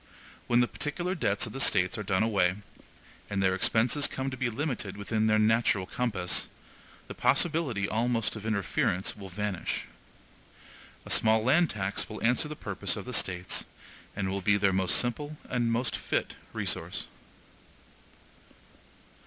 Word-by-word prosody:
When 120 0 +4
the 120 - +3
particular 175 +8 -3
debts 100 - +1
of 110 - -8
the 135 - -5
States 95 -8 +3
are - - -3
done 95 0 +1
away, 95 -5 +2 0.7
and 100 - -2
their 95 -1 +3
expenses 115 +9 +3
come 135 0 -3
to - - -4
be 130 -1 -1
limited 115 -6 -3
within 110 +2 0
their 110 0 +4
natural 110 -3 +3
compass, 100 -6 -1 0.6
the - - -7
possibility 140 - +1
almost 115 0 0
of 110 - -7
interference 100 -3 0
will 100 -2 -9
vanish. 100 -1 -3 1.2
A - - -4
small 110 0 +4
land 155 +8 +4
tax 100 -1 -1
will 110 - -7
answer 125 +6 +3
the 150 - -6
purpose - - -1
of - - -6
the - - -6
States, 90 -1 0 0.5
and 100 -2 -2
will 95 +1 -2
be 100 +2 +3
their 100 -1 +2
most 95 -1 +3
simple 145 +5 -1
and 120 -2 0
most 120 +2 0
fit - - -2 0.2
resource. - - -2
110 Hz, 155 wpm, -29 LUFS, 100-125 Hz, 1.2 s, When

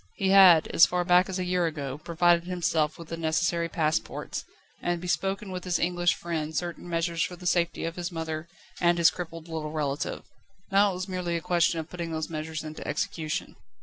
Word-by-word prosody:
He 195 - 0
had, 190 -5 +8
as 165 - +6
far 180 0 -1
back 180 +2 +4
as 190 - -2
a 185 - -1
year 180 -1 +1
ago, 145 -3 -5
provided 170 +1 +2
himself 165 -4 0
with 165 -1 -11
the 165 - -4
necessary 165 +1 0
passports, 155 -1 -2 0.4
and 175 0 -1
bespoken 195 +3 -2
with 180 -1 -5
his 180 -1 0
English 175 0 +1
friend 160 -2 -4
certain 175 0 -4
measures 165 0 -1
for 180 - -1
the 180 - -12
safety 175 -1 +1
of 165 +1 -4
his 175 0 -3
mother 160 -1 -4 0.3
and 175 0 +3
his 170 -1 +5
crippled 165 -2 -7
little 160 -2 -4
relative. 150 -2 -2 0.5
Now 200 +1 +5
it - - -3
was 185 +1 -4
merely 180 -2 -2
a - - -5
question 170 -1 +2
of 160 - -5
putting 170 -2 -4
these 160 0 -3
measures 155 0 -4
into 155 0 -7
execution. 165 -6 -3
170 Hz, 200 wpm, -27 LUFS, 160-180 Hz, 0.5 s, had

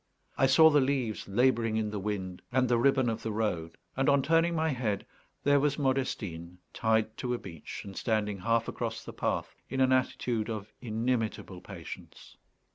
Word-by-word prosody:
I 135 - +4
saw 160 +5 +7
the 145 -1 +5
leaves 130 -5 -1
labouring 115 +1 +2
in 110 -1 -1
the 105 - -3
wind 95 -3 -4
and 130 0 +3
the 120 -1 +3
ribbon 130 0 +3
of 115 0 -1
the 110 - -3
road; 90 -7 -2 0.2
and, 135 +2 +2
on 140 -1 +4
turning 165 +2 +3
my 160 0 +1
head, 115 -8 -1 0.4
there 145 0 +5
was 145 0 +1
Modestine 105 - -2 0.2
tied 110 -1 +1
to 125 -2 -1
a - - -3
beech, 85 -8 -8
and 100 -1 -8
standing 105 -3 -1
half 115 +3 +1
across - - -4
the - - -8
path - - -2 0.2
in 135 - -3
an 130 0 +4
attitude 120 -3 0
of 110 -2 -5
inimitable 115 -5 -2
patience. 90 -5 -10
115 Hz, 180 wpm, -30 LUFS, 105-130 Hz, 0.4 s, saw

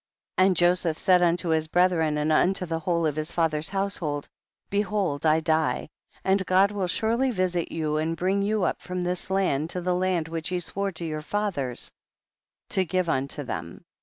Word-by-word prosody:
22. 185 - +6
And 185 -3 +1
Joseph 175 -2 +2
said 185 -3 +4
unto 175 0 +2
his 160 -1 +1
bre 175 +3 +2
thren 160 -4 0
and 150 +1 0
unto 185 +4 +3
the 165 -1 -2
whole 170 0 0
of 150 -2 0
his 155 +1 -3
fa 165 -1 +2
ther's 155 0 -3
household, 190 -7 -2 0.4
behold 200 -7 0
I 155 +1 +4
die, 160 -1 0 0.3
and 190 0 +2
God 190 +2 +4
will 200 -3 -2
surely 230 +8 +1
visit 185 -6 -1
you 155 -2 -1
and 160 +2 -1
bring 190 +4 +1
you 210 0 0
up - - -1
from 180 0 -4
this 180 +1 -2
land 175 -6 +1
to 180 - -1
the 180 +1 0
land 180 -3 0
which 165 -1 -4
he 180 -1 -1
swore 195 +3 -3
to 170 +1 -6
your 155 -1 -3
fathers 155 - -2 0.8
to 190 - +2
give 185 -1 -1
unto 140 +1 0
them. 85 -9 -6
175 Hz, 195 wpm, -26 LUFS, 155-190 Hz, 0.8 s, 22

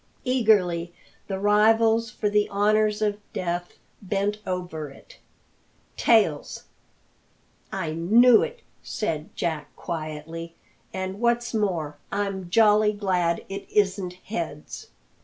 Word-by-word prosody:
Eagerly 200 -9 +2 0.4
the 195 - -3
rivals 220 +3 +3
for 215 - -2
the 210 0 +2
honours 210 +1 +2
of 205 -1 0
death 175 0 -3 0.2
bent 200 +1 -1
over 175 -5 -4
it. 135 - -16 0.8
"Tails!" - - +2 1.1
"I 175 -5 -3
knew 220 +9 +5
it!" 475 0 -4 0.2
said 160 -8 -3
Jack 155 -3 -2
quietly; 165 0 -6 0.4
"and 190 +1 -4
what's 240 0 +1
more, 170 -9 -1
I'm 195 -3 -2
jolly 210 +1 +5
glad 180 -5 0
it 195 +1 -7
isn't 195 -3 +1
heads." 165 -7 -6
195 Hz, 105 wpm, -25 LUFS, 170-215 Hz, 1.1 s, knew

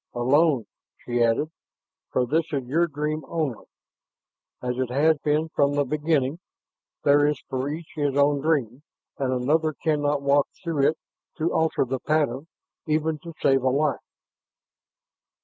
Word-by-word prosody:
"Alone," 135 +1 +3 0.4
she 120 0 0
added. 115 +7 +1 0.6
"For 125 - +1
this 160 +6 +1
is 140 -3 -1
your 160 +8 +1
dream 150 0 -3
only, 155 -8 -3 0.9
as 125 0 -3
it 130 -2 -1
has 150 +4 +3
been 150 +2 0
from 145 -2 +1
the 145 0 +2
beginning. 150 +1 0 0.6
There 145 0 +5
is 150 - 0
for 130 +1 -1
each 160 +2 -6
his 145 -2 0
own 145 0 +3
dream, 140 -5 0 0.4
and 135 -2 0
another 155 +5 +1
cannot 145 -2 0
walk 140 0 +3 0.2
through 155 -5 +2
it 160 - -3 0.4
to 165 +2 0
alter 160 -4 +1
the 130 +1 -3
pattern, 150 -1 0 0.4
even 155 0 0
to 165 0 -10
save 135 -1 +4
a 130 - +2
life." 145 +2 +1
145 Hz, 150 wpm, -25 LUFS, 130-155 Hz, 0.9 s, There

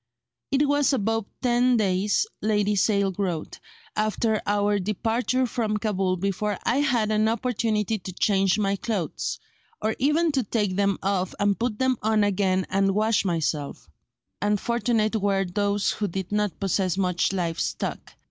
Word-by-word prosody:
"It 285 +1 +2
was 290 0 +2
above 225 -2 0 0.2
ten 245 0 +3
days," 200 - +1 0.2
Lady 210 -1 +1
Sale 200 0 +2
wrote, 175 -6 -3 0.4
"after 215 0 0
our 205 0 +2
departure 230 +6 0
from 220 -3 -1
Cabul 195 -4 0
before 200 +2 -1
I 240 - +1
had 245 -7 +1
an 215 0 +2
opportunity 225 -2 0
to 185 - -7
change 195 +1 +2
my 200 -1 0
clothes, 200 -7 -3 0.4
or 215 +1 -1
even 310 +5 +2
to 275 -2 +1
take 210 -4 -1
them 200 -1 +1
off 190 -2 -1
and 205 0 +1
put 230 -2 -1
them 260 0 +1
on 215 -1 +2
again 190 -2 +1
and 195 0 +2
wash 215 +1 +2
myself; 160 - -2 0.5
and 205 +1 +1
fortunate 230 -1 0
were 195 -1 +1
those 200 +2 0
who 210 - -2
did 190 +1 -5
not 210 -2 -1
possess 190 -2 0
much 180 -2 +1
live 175 -4 -2
stock. - - -4
205 Hz, 155 wpm, -25 LUFS, 195-225 Hz, 0.5 s, ten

